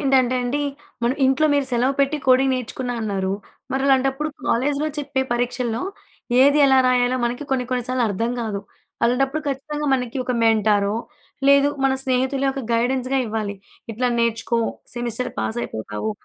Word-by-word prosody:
ఏంటంటండి, 260 0 +2 0.4
మన 235 +1 +2
ఇంట్లో 270 +4 +3
మీరు 285 -2 +2
సెలవు 250 +3 +2
పెట్టి 280 +2 +2
కోడింగ్ 260 +1 +5
నేర్చుకున్నా 250 0 -4
అన్నారు 195 -3 -1 0.4
మరి 265 0 0
అలాంటప్పుడు 270 +2 +2 0.2
కాలేజ్‌లో 285 +5 +1
చెప్పే 270 -2 -1
పరీక్షల్లో 245 -1 -1 0.6
ఏది 285 +2 +5
ఎలా 265 -1 +5
రాయాలో 250 0 +3
మనకి 245 +4 -2
కొన్ని 260 -2 +1
కొన్ని 250 -1 -1
సార్లు 255 -1 0
అర్థం 225 +4 -1
గాదు. 215 -4 -3 0.4
అలాంటప్పుడు 270 +5 +1
ఖచ్చితంగా 295 +2 -3
మనకి 250 -1 -3
ఒక 250 - -1
మెంటారో, 210 -2 +3 0.5
లేదు 280 0 +6 0.2
మన 270 - +4
స్నేహితులే 265 +1 0
ఒక 270 - -4
గైడెన్స్‌గా 255 +3 +1
ఇవ్వాలి. 215 -2 -3 0.4
ఇట్లా 245 +3 -1
నేర్చుకో, 235 0 0 0.4
సెమిస్టర్ 240 0 -3
పాసైపోతావు. 110 -1 -3
250 Hz, 140 wpm, -22 LUFS, 230-270 Hz, 0.6 s, లేదు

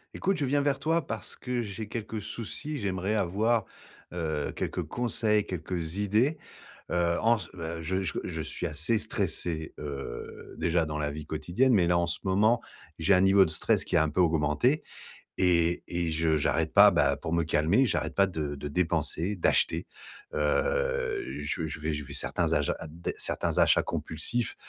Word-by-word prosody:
Écoute, 195 0 0
je 145 - +1
viens 145 +2 +2
vers 140 -1 +1
toi 160 0 +1
parce 110 - -6
que 125 -1 -3
j'ai 105 0 -6
quelques 110 0 -5
soucis. 120 +8 -5
J'aimerais 95 0 -1
avoir, 110 +4 +1 0.5
heu, 80 -4 -2
quelques - - -2
conseils, 110 -3 0
quelques 85 -1 -4
idées. 110 +10 +1 0.5
Heu, 85 -1 +1
en 115 +1 +4
c 100 - -8
beh, 85 -2 -5
je 95 +4 -1
c 85 - -2
je - - -4
suis - - -3
assez 80 +10 +2
stressé, 85 -6 -2
heu, 70 -4 -7
déjà 85 -1 +1
dans 75 0 -3
la 75 -1 -1
vie 75 +1 -7
quotidienne, 85 +13 +1
mais 95 -6 +4
là, 85 0 +3
en 85 - 0
ce 85 - -2
moment, 105 +5 +3 0.4
j'ai 90 +5 +3
un 90 - +5
niveau 95 0 +6
de 80 - -4
stress - - +2
qui - - -2
a - - +5
un 80 - 0
peu 85 +5 +1
augmenté 80 - +2 0.6
et 85 -1 +3
et 85 -2 -1
je 80 0 +2
j'arrête 75 - 0
pas, - - +8
bah, 70 -1 +3
pour 80 +3 -5
me 85 0 +2
calmer, 80 - +3
j'arrête - - -1
pas 100 0 +4
de 75 -5 -3
de 75 +1 -6
dépenser, 85 +3 0
d'acheter. 90 - +1 0.5
Heu, 485 - 0 0.2
je 85 - -3
veux - - -1
je 75 - -7
vais 80 +1 -1
je 75 0 -4
vais - - -9
certains - - -1
achats - - +1
a - - -7
d 85 +3 -5
certains - - 0
achats - - +5
compulsifs 110 +9 -2
90 Hz, 185 wpm, -28 LUFS, 80-115 Hz, 0.6 s, pas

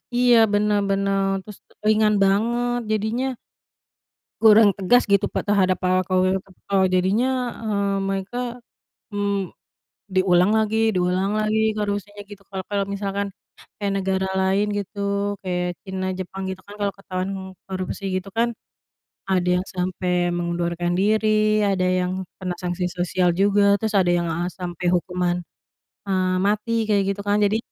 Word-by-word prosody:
Iya, 245 -1 +5 0.2
bener 210 0 +2
bener, 195 0 +1 0.2
terus 210 -2 -12 0.3
ringan 215 0 +4
banget, 240 +5 +1
jadinya 220 +4 0 1.2
kurang 220 -1 +7
tegas 205 +3 +3
gitu, 200 +1 +4
Pak, - - -3
terhadap 190 -3 +3
para 185 0 +2
koruptor. 190 +1 0
Jadinya, 190 +7 +2 0.4
eee, 200 -2 0
mereka, 195 +4 -3 0.8
mmm, 200 -2 -1 0.7
diulang 185 0 +4
lagi 220 0 +1 0.2
diulang 185 +2 +1
lagi, 215 +1 +1 0.2
gak 210 - 0
harusnya 205 0 -4
gitu 205 -1 -11
kalau 190 -1 -4
kalau 200 -1 0
misalkan 200 0 -2 0.5
kayak 200 -1 -1
negara 190 0 0
lain 195 +2 +2
gitu 200 +1 -6 0.4
kayak 180 -1 -1
China, 190 -1 -4
Jepang, 190 +1 -5
gitu 190 0 -6
kan 205 - -10
kalau 200 -1 0
ketahuan 185 -1 -4 0.4
korupsi 190 +1 -5
gitu 185 +1 -4
kan, 235 +1 +3 0.8
ada 180 -1 +2
yang 185 - -7
sampai 180 0 -2 0.2
mengundurkan 175 0 -1
diri, 215 +2 +2 0.4
ada 190 -2 +1
yang 180 0 -1 0.3
kena 180 -1 -3
sanksi 180 0 -2
sosial 180 0 +1
juga, 205 +1 +4 0.2
terus 220 0 -2
ada 175 -1 +2
yang, 170 - -1
eee, 175 +2 -2
sampai 180 -1 -4
hukuman, 180 0 0 0.7
eee, 185 -1 +1
mati 210 +2 0 0.2
kayak 200 -2 +3
gitu 200 - -7
kan. 205 0 +3
Jadi 205 +2 +2
195 Hz, 140 wpm, -23 LUFS, 185-205 Hz, 1.2 s, kurang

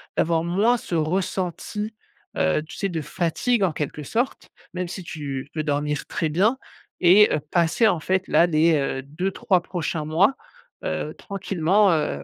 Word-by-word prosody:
d'avoir 165 0 +1
moins 205 +8 +2
ce 180 - -5
ressenti, 185 +5 -2 0.4
heu, 80 - +2
tu 155 - -11
sais, 200 - -1
de 170 -4 -3
fatigue 190 +9 0
en 180 -4 +1
quelque 150 0 -4
sorte. 235 - -2 0.3
Même 180 0 -3
si 185 +2 -7
tu 145 -4 -5
peux 155 - -2
dormir 145 0 -1
très 160 - -1
bien 200 - +2 0.4
et 190 +4 +7
heu, 150 - 0
passer 175 +6 +3
en 175 - 0
fait, 190 +4 0
là, 170 - +5
les, 165 -1 +3
heu, 135 -2 -1
2-3 180 +6 0
prochains 170 -3 -3
mois, 175 - +3 0.5
heu, - - -2
tranquillement, 195 0 +1
heu, 70 - -1
170 Hz, 160 wpm, -23 LUFS, 155-195 Hz, 0.5 s, et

